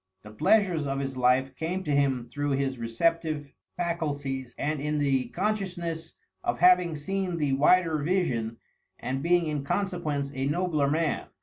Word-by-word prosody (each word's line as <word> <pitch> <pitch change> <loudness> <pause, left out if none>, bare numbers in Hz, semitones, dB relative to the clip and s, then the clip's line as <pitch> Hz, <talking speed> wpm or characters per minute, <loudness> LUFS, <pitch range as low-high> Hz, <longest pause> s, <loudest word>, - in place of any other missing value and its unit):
The 105 - -11
pleasures 170 - +2
of 135 0 -1
his 135 -1 -3
life 130 +1 +2
came 175 +6 -3
to 150 - -2
him 135 -4 +1
through 145 +2 -2
his 135 -2 -1
receptive 150 +5 0 0.3
faculties, 145 -7 -3
and 150 0 -1
in 150 +1 -1
the 135 -3 +1
consciousness 175 - -3 0.3
of - - 0
having 180 -1 +5
seen 185 +3 -2
the 145 -4 +1
wider 160 +3 +4
vision, 135 -9 0 0.4
and 130 +1 -3
being 175 +2 +3
in 150 -3 -2
consequence 155 -5 -1
a 135 0 -1
nobler 155 -2 +1
man. 155 +1 0
150 Hz, 150 wpm, -27 LUFS, 135-170 Hz, 0.4 s, having